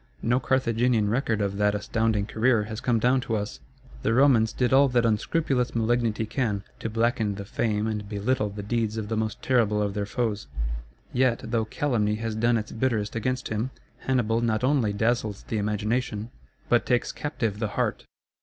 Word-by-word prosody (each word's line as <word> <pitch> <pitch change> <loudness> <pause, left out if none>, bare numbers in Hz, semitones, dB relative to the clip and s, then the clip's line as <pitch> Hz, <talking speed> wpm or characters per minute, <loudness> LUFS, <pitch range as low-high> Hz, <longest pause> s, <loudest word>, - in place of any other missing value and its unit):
No 120 +3 +2
Carthaginian 115 -4 +1
record 115 -3 0
of 100 -1 -1
that 105 0 +2
astounding 110 0 0
career 110 +1 +2
has 110 +1 -6
come 120 -2 +2
down 125 +3 +3
to 115 -3 -2
us. 105 -10 -4 0.4
The 115 - +1
Romans 125 -5 +5
did 125 +1 0
all 140 +1 +6
that 120 -2 +2
unscrupulous 125 +3 0
malignity 115 -1 +1
can, 110 -4 -1 0.2
to 115 - -3
blacken 115 -2 0
the 100 0 -6
fame 105 0 -1
and 105 -2 -3
belittle 105 +1 0
the 100 0 -7
deeds 110 0 -1
of 105 -2 -4
the 110 - -1
most 110 -1 -2
terrible 115 -5 +2
of 100 -1 0
their 100 0 -2
foes. 105 -5 -2 0.7
Yet, 125 -2 +2
though 115 -1 0
calumny 110 -4 0
has 110 0 -3
done 115 +2 +2
its 110 - -4
bitterest 115 -3 -1
against 125 +3 -2
him, 110 +4 -1 0.3
Hannibal 120 -3 +1
not 115 -1 0
only 130 -5 +2
dazzles 110 -1 0
the 110 - -2
imagination, 105 +2 -1 0.4
but - - +2
takes 125 -1 +1
captive 115 -9 -3
the 110 - 0
heart. - - -1
115 Hz, 180 wpm, -26 LUFS, 105-120 Hz, 0.7 s, all